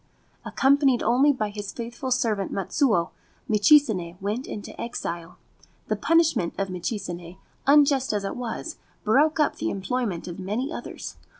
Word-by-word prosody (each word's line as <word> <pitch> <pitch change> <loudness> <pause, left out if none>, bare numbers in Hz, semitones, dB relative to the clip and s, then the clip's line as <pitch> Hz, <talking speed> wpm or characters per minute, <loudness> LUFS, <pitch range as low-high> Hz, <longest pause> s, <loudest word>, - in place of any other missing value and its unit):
Accompanied 270 -2 +3
only 270 +5 +4
by 220 -6 -2
his 205 -1 -6
faithful 240 +2 -5
servant 225 -6 0
Matsuo, 195 - +1 0.4
Michizane 210 - +4
went 210 +7 -3
into 205 - -6
exile. 170 -7 -5 0.5
The - - +2
punishment 320 - +2
of 195 -1 -1
Michizane, 180 -2 -5 0.3
unjust 280 -2 +5
as 205 -1 -1
it 195 - -3
was, 250 +6 -5 0.3
broke 295 +9 +3
up 300 - +2
the - - -1
employment 200 -2 -2
of 175 +1 -7
many 220 - -3
others. - - -7
220 Hz, 135 wpm, -25 LUFS, 195-270 Hz, 0.5 s, unjust